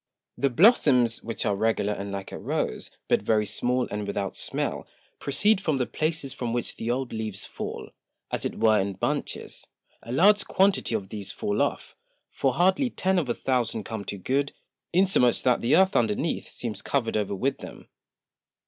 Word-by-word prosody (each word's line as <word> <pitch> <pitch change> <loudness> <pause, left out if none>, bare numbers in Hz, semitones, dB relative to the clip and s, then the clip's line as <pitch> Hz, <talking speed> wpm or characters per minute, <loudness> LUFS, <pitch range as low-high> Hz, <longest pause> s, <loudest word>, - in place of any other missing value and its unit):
The 140 - +1
Blossoms, 125 - +4
which 115 -1 -3
are 105 -2 +1
regular 105 -1 +1
and 100 0 -5
like 100 -1 -6
a - - -6
Rose, - - -2 0.2
but - - +3
very 105 -1 +2
small, 125 +4 0
and 105 0 -3
without 100 -1 -3
smell, - - -3 0.3
proceed 195 +9 +2
from 155 -7 0
the 125 - +1
Places 155 -2 -2
from 120 -2 -3
which 120 -1 -3
the 115 - -4
old 125 +1 -1
Leaves 110 -3 -4
fall, - - -6 0.4
as - - -1
it - - -3
were 110 -1 +4
in 100 +1 -2
Bunches. - - -3 0.3
A 115 - -9
large 195 +9 +4
Quantity 195 - +2
of 100 -3 -3
these 105 -2 -5
fall 105 0 -1
off, - - -2 0.4
for 135 -2 0
hardly 190 - +3
Ten 190 -4 +1
of 145 -7 -3
a 120 - 0
Thousand 120 -4 -1
come 110 0 -5
to 100 - -4
good, 135 +8 -1 0.4
insomuch 175 -10 +3
that 125 -1 +3
the 120 +5 +3
Earth 190 +2 +4
underneath 115 +8 0
seems 110 -5 -5
cover'd 125 -5 -1
over 100 -2 -1
with 130 +7 -1
them. - - -10
120 Hz, 180 wpm, -26 LUFS, 105-145 Hz, 0.4 s, Blossoms